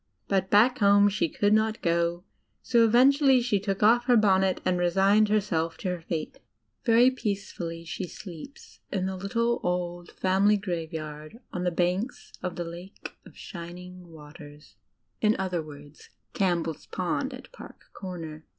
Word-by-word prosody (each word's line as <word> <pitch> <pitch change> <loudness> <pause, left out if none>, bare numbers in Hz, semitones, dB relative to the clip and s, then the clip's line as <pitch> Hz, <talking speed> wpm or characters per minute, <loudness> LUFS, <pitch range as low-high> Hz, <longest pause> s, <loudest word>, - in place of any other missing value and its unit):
But 190 -1 0
back 230 +5 +4
home 205 0 +5
she 190 -4 0
could 205 +5 +1
not 220 0 +1
go, 170 0 0 0.4
so 235 -2 +4
eventually 265 +4 +5
she 235 -4 0
took 195 0 -2
off 240 +3 +5
her 245 -2 +5
bonnet 190 -3 +3
and 180 -1 +1
resigned 195 +4 +3
herself 165 -6 0
to 185 - -3
her 180 -1 -3
fate. 160 -1 -5 0.4
Very 240 +1 +5
peacefully 195 -8 -4
she 180 +2 -5
sleeps 180 - -11
in 190 -2 -1
the 190 0 -3
litde, 230 +5 -1
old, 175 -1 -3
family 195 +3 +2
graveyard 160 -2 -6
on 180 0 -3
the - - +3
banks 180 +7 -2
of 180 -1 -4
the 175 - -3
"Lake 175 +4 -10
of - - -17
Shining 180 +1 -9
Waters" 150 -4 -14 0.2
— - - -49
in 215 0 +3
other 185 -3 -2
words, 145 -1 -13 0.2
Campbell's 170 -5 -1
Pond 185 +10 -2
at 255 0 -11
Park - - -14
Comer. 165 -5 -7
185 Hz, 155 wpm, -27 LUFS, 170-210 Hz, 0.4 s, home